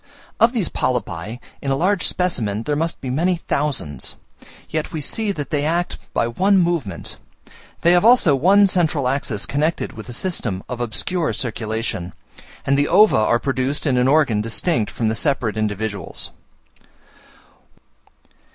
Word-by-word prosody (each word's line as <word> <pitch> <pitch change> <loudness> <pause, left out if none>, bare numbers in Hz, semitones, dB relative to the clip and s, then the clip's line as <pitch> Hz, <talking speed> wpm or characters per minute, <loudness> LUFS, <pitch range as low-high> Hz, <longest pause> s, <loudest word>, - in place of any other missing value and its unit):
Of 230 +2 +6
these 225 -9 0
polypi, 115 -4 -2 0.2
in 140 - -3
a 135 - +2
large 185 +6 +1
specimen, 115 - -1
there 145 +4 -1
must 165 +2 -2
be 130 - -4
many 175 +7 +1
thousands; 140 - -2 0.5
yet 155 0 -3
we 160 - -3
see 210 +8 0
that 145 -8 -5
they 145 -1 +1
act 170 +3 -1
by 115 - +1
one 190 +12 +2
movement: 170 - -1 0.7
they 170 - +6
have 175 0 +4
also 225 - +6
one 195 +9 +5
central 160 -8 +1
axis 125 -5 -1
connected 155 +4 -1
with 110 +2 -10
a - - -6
system 115 - -3
of 125 -1 -5
obscure 160 - -1
circulation, 110 -6 -3 0.5
and 140 +1 +2
the 145 - +2
ova 210 +4 +6
are 110 +2 +3
produced 135 +4 -2
in 135 -4 +2
an 125 +1 +3
organ 135 -7 +3
distinct 115 - 0
from 115 - -2
the 110 - +1
separate 115 -1 0
individuals. 110 -1 -3
140 Hz, 150 wpm, -21 LUFS, 115-170 Hz, 0.7 s, Of